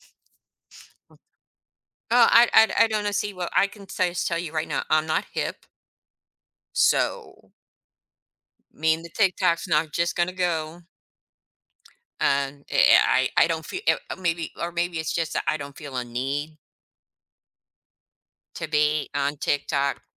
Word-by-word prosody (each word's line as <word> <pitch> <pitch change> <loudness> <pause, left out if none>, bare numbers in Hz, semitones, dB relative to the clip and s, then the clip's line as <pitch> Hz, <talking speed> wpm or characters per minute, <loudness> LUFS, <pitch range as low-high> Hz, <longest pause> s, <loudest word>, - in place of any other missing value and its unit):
Hmm. - - -25 2.0
Oh, 240 -1 +6
I 235 0 +6
I 220 - +5
I - - +3
don't 210 -2 -2
see 205 -1 -2
what 180 -1 -4
I 200 - +4
can 200 -1 -14
say 180 -2 -1
tell 170 -1 -1
you 165 -3 -5
right 155 -1 -2
now, - - -2
I'm 155 0 +3
not 155 - -1
hip. - - -4 1.1
So - - 0 1.2
mean 160 +1 0
the 170 - -9
TikTok's 180 -4 +1
not 155 -2 0
just 170 0 0
gonna 175 +1 0
go. 170 -2 -2 1.4
And 140 0 0
eh, - - +6
I 130 0 +2
I - - +6
don't 160 -1 -3
fee 375 - -6
uh, - - 0
maybe, 170 -3 -2
or 170 0 -3
maybe 170 -1 -2
it's 160 - -2
just 165 -2 -2
that - - -1
I 155 - +2
don't 140 -1 -9
feel 145 -4 -8
a 125 - -2
need 140 +6 -4 2.0
to - - -5
be 150 0 +1
on 145 +1 -1
TikTok. 140 0 -1
165 Hz, 145 wpm, -24 LUFS, 150-180 Hz, 2.0 s, Oh